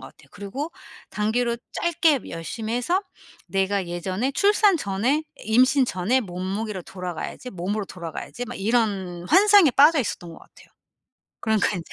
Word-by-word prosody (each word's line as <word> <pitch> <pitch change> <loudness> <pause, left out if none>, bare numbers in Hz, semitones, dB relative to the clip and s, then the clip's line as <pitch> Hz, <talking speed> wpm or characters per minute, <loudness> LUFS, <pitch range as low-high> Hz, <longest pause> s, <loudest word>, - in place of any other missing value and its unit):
같아요. - - -14
그리고 265 +11 -6 0.4
단기로 235 +3 0 0.2
짧게 320 -5 +2
열심히 215 +7 -4
해서 345 +11 0 0.5
'내가 195 -1 0
예전에 185 +9 -2
출산 410 +1 +4
전의 245 +8 0 0.2
임신 255 +4 +4
전의 225 +8 +1
몸무게로 190 +2 -4
돌아가야지. 180 +7 -6
몸으로 200 +2 -3
돌아가야지.' 180 +7 -7
막 245 - -7
이런 195 -5 -1
환상에 400 -4 +6
빠져 295 +2 +6
있었던 175 -7 -5
것 - - -12
같아요. - - -19 0.7
그러니까 220 -2 +2
인제 170 - -8
220 Hz, 335 characters per minute, -24 LUFS, 185-270 Hz, 0.7 s, 환상에